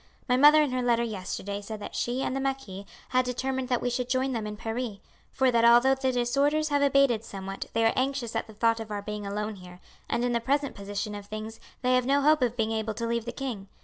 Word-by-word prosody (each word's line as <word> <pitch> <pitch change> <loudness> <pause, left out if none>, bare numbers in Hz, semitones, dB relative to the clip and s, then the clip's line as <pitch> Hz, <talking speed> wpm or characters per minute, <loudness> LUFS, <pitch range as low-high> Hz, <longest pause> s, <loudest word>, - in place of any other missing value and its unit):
My 250 - +3
mother 295 +3 +7
in 285 - -1
her 255 0 0
letter 235 -1 +2
yesterday 200 -1 -4
said 215 +1 -7
that - - -7
she 250 +2 -1
and 255 - -2
the - - -1
marquis 265 -8 -4 0.2
had 255 0 +3
determined 260 +1 -2
that 245 -2 0
we 245 - 0
should 245 0 -2
join 260 +1 +1
them 225 -4 -3
in 210 0 -6
Paris; 225 -1 -4 0.3
for 265 -1 +2
that 230 -1 +3
although 240 +3 +6
the 265 -1 0
disorders 280 +5 +1
have 285 -1 +2
abated 275 -5 +3
somewhat 195 -3 -6
they 230 0 +2
are 225 - +4
anxious 260 -3 -1
at 225 - -1
the 220 - -13
thought 230 +1 +2
of 220 -1 -7
our 205 -1 -4
being 210 -1 -5
alone 210 +1 -3
here, 180 -1 -12 0.3
and 240 - 0
in 245 - 0
the 235 - +1
present 280 +4 0
position 205 +1 -4
of 205 -1 -8
things 215 +1 -7 0.2
they 250 0 +3
have 255 0 +2
no 280 +1 +3
hope 305 +1 +4
of 245 -1 0
being 225 -1 0
able 220 -1 -2
to 235 - -3
leave 235 -1 -1
the 240 - -3
king. 235 -8 -5
235 Hz, 250 wpm, -27 LUFS, 215-260 Hz, 0.3 s, mother